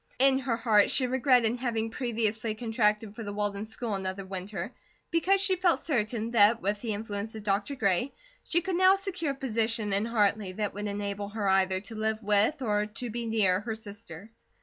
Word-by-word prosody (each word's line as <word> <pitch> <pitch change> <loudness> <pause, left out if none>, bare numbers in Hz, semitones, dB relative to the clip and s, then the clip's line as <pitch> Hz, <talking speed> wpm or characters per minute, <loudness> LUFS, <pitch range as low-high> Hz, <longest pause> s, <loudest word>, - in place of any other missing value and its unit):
In 265 0 +4
her 250 -4 -1
heart 220 -3 +4
she 260 - +1
regretted 250 -2 +3
having 225 -3 -2
previously 225 -3 -1
contracted 220 -2 0
for 235 - -7
the 205 -2 -5
Walden 205 0 -2
school 225 0 -3
another 190 0 -4
winter 190 +3 -5 0.4
because 380 +4 +3
she 380 -2 +2
felt 355 -1 +2
certain 230 -5 -1
that 225 0 +5
with 205 0 -2
the 220 -3 -2
influence 210 +1 -5
of 215 - -7
Dr. 205 +6 -1
Gray, 210 +2 +1 0.3
she 345 - +1
could 365 0 -2
now 375 +1 +6
secure 365 -7 -3
a - - -12
position 225 -5 -1
in 200 +2 +1
Hartley 210 -4 +1
that 210 +1 -2
would 205 +1 -4
enable 200 0 -3
her 210 -1 -3
either 190 -1 +3
to 220 - -9
live 220 0 -2
with, 210 +8 +2
or 210 -2 +1
to 230 +2 -4
be 235 +1 -4
near, 200 -5 +3
her 220 +2 -4
sister. 205 -3 -10
220 Hz, 195 wpm, -28 LUFS, 205-245 Hz, 0.4 s, now